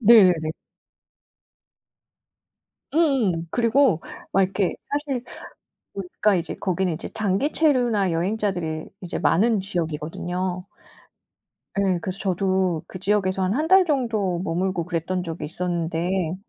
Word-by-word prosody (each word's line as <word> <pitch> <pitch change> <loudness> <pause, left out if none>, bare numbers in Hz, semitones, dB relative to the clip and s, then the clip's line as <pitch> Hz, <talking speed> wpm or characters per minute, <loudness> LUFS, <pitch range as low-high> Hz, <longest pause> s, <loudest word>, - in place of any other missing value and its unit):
네네네. 185 -9 +6 2.4
음음. 240 - +2
그리고 235 - +3 0.3
막 195 - +4
이렇게 190 0 0 0.2
사실 285 -3 -2 0.7
보니까 195 +2 0
이제 170 - -2
거기는 185 -1 0
이제 160 - -5
장기 215 +8 0
체류나 245 - +2
여행자들이 175 -3 -1 0.2
이제 180 - -4
많은 220 +3 +3
지역이거든요. 175 +1 -3 1.1
예 195 -3 +2
그래서 185 +2 -4
저도 185 -3 0
그 185 - -8
지역에서 195 -1 +1
한 185 +2 +1
1 310 +5 0
달 380 0 +7
정도 225 - 0
머물고 180 0 -1
그랬던 180 +1 -2
적이 165 -1 -5
있었는데 170 +1 -1
185 Hz, 260 characters per minute, -24 LUFS, 175-215 Hz, 2.4 s, 달